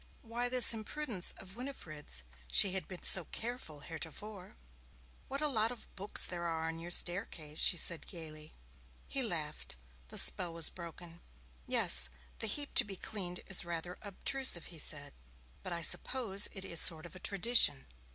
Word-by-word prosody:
Why 240 +1 -4
this 250 -1 +8
imprudence 220 -2 -2
of 190 +1 -14
Winifred's? 155 - -7 0.2
She 185 - +3
had 185 -4 -4
been 180 -2 -11
so 185 -3 +8
careful 225 - -8
heretofore. 175 +6 -9 0.7
'What 275 +2 -5
a 305 - 0
lot 225 -5 +1
of 245 - -12
boots 200 +2 0
there 175 -1 -6
are 160 -1 -4
on 165 0 -6
your 170 +1 -8
staircase!' 175 -4 -1
she 175 - +5
said 170 -1 +1
gaily. 155 -3 -11 0.6
He - - 0
laughed. 65 0 -5 0.3
The - - -9
spell 175 -3 +4
was 165 -2 +3
broken. 170 0 -12 0.5
'Yes, 65 0 +4 0.3
the 225 - -1
heap 285 +7 -3
to - - +5
be 200 -1 -9
cleaned 180 -3 -6
is 190 - +2
rather 170 +1 -7
obtrusive,' 210 - -1
he 165 - -7
said, 145 -1 -1 0.5
'but 185 - -4
I 170 -1 -4
suppose 210 0 +4
it 195 -1 -6
is 170 - 0
a - - +3
sort 160 -2 +4
of 180 +1 -12
tradition.' 200 - +2
180 Hz, 165 wpm, -32 LUFS, 165-220 Hz, 0.7 s, this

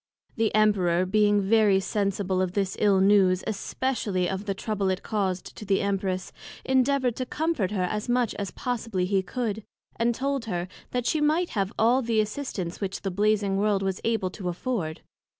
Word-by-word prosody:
The 225 -2 +1
Emperor 185 -5 +3
being 205 +1 +3
very 205 -1 +4
sensible 195 -1 -1
of 185 -1 -1
this 195 -1 -1
ill 200 -2 +4
news, 190 -2 +4
especially 210 -3 -1
of 190 +2 -3
the 195 -1 -2
Trouble 200 -1 -1
it 185 0 -2
caused 190 -4 -2
to - - -7
the 195 -1 +1
Empress, 195 -2 -1 0.3
endeavoured 260 -2 +2
to 255 - -2
comfort 315 - -1
her 195 -3 -1
as 210 +5 -2
much 245 -2 +2
as 200 -1 -2
possibly 225 -7 -2
he 195 +1 +1
could; 220 +1 -3 0.3
and 235 +1 +1
told 275 -1 -1
her, 180 -4 -3 0.2
that 245 -1 -2
she 310 - +1
might 315 +4 +2
have 195 -2 -1
all 240 +4 +4
the 230 -2 +1
assistance 215 -6 -3
which 195 +1 -3
the 195 - -1
Blazing 205 0 +1
World 200 -1 +1
was 190 -1 -2
able 220 -5 0
to 185 -2 -4
afford. 175 -4 -3
205 Hz, 180 wpm, -26 LUFS, 190-230 Hz, 0.3 s, very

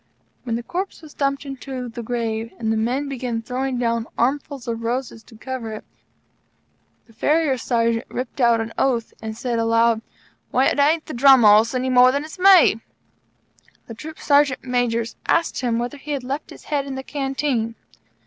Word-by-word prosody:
When 230 -2 -1
the 235 - -4
corpse 365 +4 -5
was 305 - -12
dumped 275 0 -1
into 265 -2 -6
the 235 0 -7
grave 230 -1 -3
and 225 -1 -1
the - - 0
men 245 +6 -1
began 245 -4 -3
throwing 255 +2 -2
down 230 -1 -1
armfuls 275 +1 -1
of 230 -1 -3
roses 235 0 -3
to 230 - -16
cover 240 -2 -5
it, 215 - -7 1.2
the 230 - -21
Farrier 295 +5 +2
Sergeant 230 -2 0
ripped 255 +2 -5
out 235 -1 +4
an 225 0 -6
oath 240 -4 0
and 220 0 -6
said 240 -1 -2
aloud: 230 0 +3 0.5
"Why, 260 +2 +2
it - - -2
ain't 310 +3 +3
the 310 - -7
Drum 265 0 +6
Horse 215 +3 +6
any 255 +1 0
more 250 0 +6
than 285 +3 -2
it's 315 +4 -11
me!" 365 - +6 1.0
The 230 - -9
Troop 310 +7 -9
Sergeant 285 -2 +2
Majors 240 -2 -1
asked 335 - +1
him 240 -2 0
whether 240 +4 -3
he 295 +2 -5
had 275 -3 -3
left 275 +4 -4
his - - -13
head 285 -2 -2
in 270 - -5
the 265 - -5
Canteen. 270 -5 -2
250 Hz, 185 wpm, -22 LUFS, 230-275 Hz, 1.2 s, Drum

